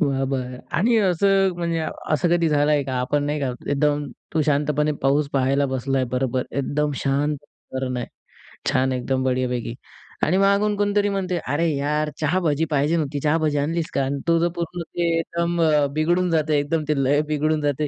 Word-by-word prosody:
बरं, 135 -3 +1
बरं. 125 -1 -3 0.2
आणि 230 +8 +3
असं 195 -1 +3
म्हणजे 170 -1 -1 0.3
असं 155 +3 +2
कधी 170 -1 +3
झालं 150 0 +2
आहे 145 -1 +3
का? 130 - -3
आपण 145 +3 0
नाही 145 0 -1
का, 135 -2 0 0.2
एकदम 145 +1 +1 0.3
तू 155 - +3
शांतपणे 150 0 +1
पाऊस 140 +2 +2
पाहायला 135 +1 +2
बसला 130 +1 -1
आहे, 130 - +1
बरोबर. 130 0 0
एकदम 145 +2 -1
शांत 145 +2 +1 0.4
वातावरण 130 -1 -2
आहे. 120 - -3 0.6
छान 130 -1 +2
एकदम 130 +1 -1
बढियापैकी 125 -2 -1 0.5
आणि 180 +4 +3
मागून 200 +1 +3
कोणीतरी 205 0 +2
म्हणते, 185 -2 -1 0.2
"अरे 165 +3 +1
यार! 150 +2 0
चहा-भजी 160 -1 +1
पाहिजे 145 +3 +2
होती. 145 -2 -2
चहा-भजी 155 0 +1
आणलीस 160 +3 -1
का?" 140 - +1
आणि 140 +1 -2
तुझं 170 +1 +3
पूर्ण 170 0 -4
ते 170 +1 -2
एकदम 170 +1 -1
अ, 150 -2 +4
बिघडून 175 +4 +1
जाते. 155 -2 +2
एकदम 155 +2 -1
ते 140 -3 +2
लय 145 +3 +3
बिघडून 155 +1 +1
जाते. 145 +1 0
150 Hz, 180 wpm, -23 LUFS, 140-170 Hz, 0.6 s, अ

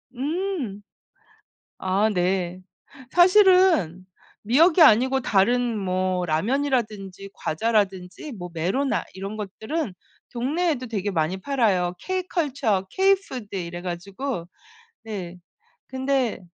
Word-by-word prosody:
음. 290 - -3 1.0
아 195 +4 +1
네 180 0 -1 0.5
사실은 360 - +5 0.4
미역이 320 - +4
아니고 260 +1 +6
다른 235 +3 +2
뭐 185 -1 -1
라면이라든지 205 - -1
과자라든지 195 - -1
뭐 180 -6 -7
메로나 190 - 0
이런 195 +3 -6
것들은 220 - -4 0.4
동네에도 270 +2 -1
되게 205 -2 -2
많이 165 +2 0
팔아요. 195 -8 +1
K-컬처 285 - -1
K-푸드 380 - 0
이래 175 -1 -5
가지고 185 +3 -5 0.6
네. 185 -5 -6 0.5
근데 260 -3 -1
215 Hz, 220 characters per minute, -24 LUFS, 185-275 Hz, 1.0 s, 아니고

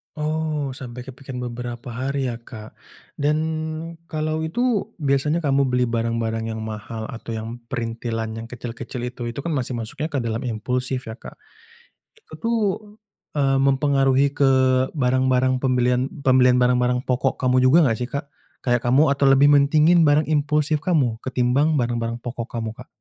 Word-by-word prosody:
Oh, 155 -2 -2
sampai 125 -2 -8
ke 130 - -9
pikiran 125 -2 -6
beberapa 120 +1 -6
hari 130 +1 -2
ya 115 - -7
Kak 110 -2 -11 0.5
dan 150 +1 +2 0.7
kalau 155 0 -2
itu 220 +4 0 0.2
biasanya 140 +4 +2
kamu 140 -1 +2
beli 125 0 +2
barang-barang 115 -1 -1
yang - - -5
mahal 110 +1 -6
atau 115 -1 -7
yang 115 +2 -6
printilan 115 -2 -3
yang 115 - -7
kecil-kecil 120 +1 -7
itu, 125 - -13
itu 120 - -6
kan 170 - -2
masih 130 -3 -2
masuknya 115 +7 -3
ke 145 - -2
dalam 115 0 -2
impulsif 125 +3 -2
ya - - -5
Kak, - - -11 0.8
itu - - -24
tuh, 230 0 +1 0.8
eee, 135 -2 +2
mempengaruhi 135 0 +3
ke 140 -2 +5 0.4
barang-barang 130 -1 +2
pembelian 125 -1 +2 0.2
pembelian 125 -1 +5
barang-barang 125 0 +2
pokok 130 +1 +1
kamu 130 -1 +2
juga 130 +5 +6
enggak 115 -3 0
sih, 125 -1 -3
Kak? 140 +2 -3 0.4
Kayak 120 -1 +2
kamu 140 +5 +4
atau 140 0 +2
lebih 135 +1 +6
mentingin 155 +4 +5
barang 145 +2 +4
impulsif 150 0 +1
kamu 140 -10 +1
ketimbang 130 +4 +2
barang-barang 120 -2 -1
pokok 120 -1 -4
kamu 115 -2 -4
Kak? - - -11
130 Hz, 155 wpm, -22 LUFS, 120-145 Hz, 0.8 s, juga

